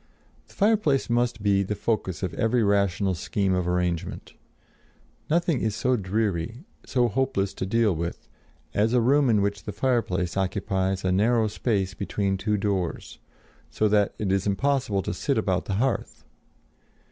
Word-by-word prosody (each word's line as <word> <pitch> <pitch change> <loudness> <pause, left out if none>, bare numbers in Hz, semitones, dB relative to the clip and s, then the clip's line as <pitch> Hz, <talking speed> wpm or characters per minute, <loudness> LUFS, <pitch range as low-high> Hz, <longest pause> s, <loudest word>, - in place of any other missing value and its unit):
The - - -20
fireplace 200 - +2
must 120 -2 0
be 100 -1 +3
the 100 +2 -2
focus 100 -5 -2
of 90 - -2
every 115 +1 +1
rational 100 -2 +2
scheme 95 +2 -1
of 90 -1 0
arrangement. 90 -2 -2 1.0
Nothing 165 -3 +1
is 110 -2 -1
so 125 +3 +1
dreary, 105 - -2 0.2
so 125 -3 +1
hopeless 105 -5 0
to 95 - -4
deal 110 -2 +2
with, 85 +1 -5 0.5
as 110 +3 +2
a 125 - +4
room 135 +3 +3
in 105 -3 +3
which 100 0 -2
the - - -3
fireplace 100 -9 0
occupies 95 0 -1
a 95 - +2
narrow 110 +4 +3
space 105 -3 -1
between 100 -1 -1
two 105 +2 -1
doors, 100 -4 -2 0.5
so 110 - +1
that 105 -1 +2
it 100 -3 -1
is 95 +1 +1
impossible 110 -2 0
to - - -3
sit - - -1
about - - 0
the 100 - -2
hearth. 130 +4 -1
105 Hz, 160 wpm, -25 LUFS, 95-120 Hz, 1.0 s, a